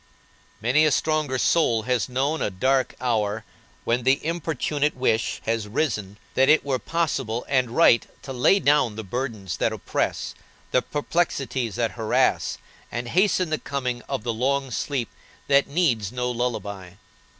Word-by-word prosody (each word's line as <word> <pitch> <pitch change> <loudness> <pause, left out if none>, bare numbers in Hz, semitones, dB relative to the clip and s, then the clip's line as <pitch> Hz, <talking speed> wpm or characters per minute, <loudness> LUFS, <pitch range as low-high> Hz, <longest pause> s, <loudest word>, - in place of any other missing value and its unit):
Many 125 +7 +3
a 155 - +3
stronger 155 -3 +1
soul 120 -6 +2
has 125 +1 0
known 140 +5 0
a - - +1
dark 130 +7 +1
hour 110 -3 -1 0.4
when 120 +2 +1
the 130 +4 +2
importunate 155 -3 -1
wish 125 -3 0
has 115 -2 -1
risen 105 -5 -2 0.2
that 135 +1 +4
it 155 -1 +5
were 135 -2 0
possible 130 -4 -1
and 130 -3 +2
right 120 -2 +4 0.2
to 135 0 -6
lay 130 +10 +4
down 145 - +3
the 110 - -5
burdens 110 -4 -4
that - - +1
oppress, - - -2 0.4
the 125 - +3
perplexities 140 - -1
that 115 -2 0
harass, 110 -2 +1 0.3
and 120 0 -4
hasten 185 - +2
the 155 - 0
coming 125 -3 -3
of 135 -5 -2
the 120 -1 -1
long 135 +3 0
sleep 130 -2 -2 0.4
that 140 0 +4
needs 130 - +1
no 125 0 -2
lullaby. 100 -7 -3
125 Hz, 150 wpm, -24 LUFS, 115-145 Hz, 0.4 s, it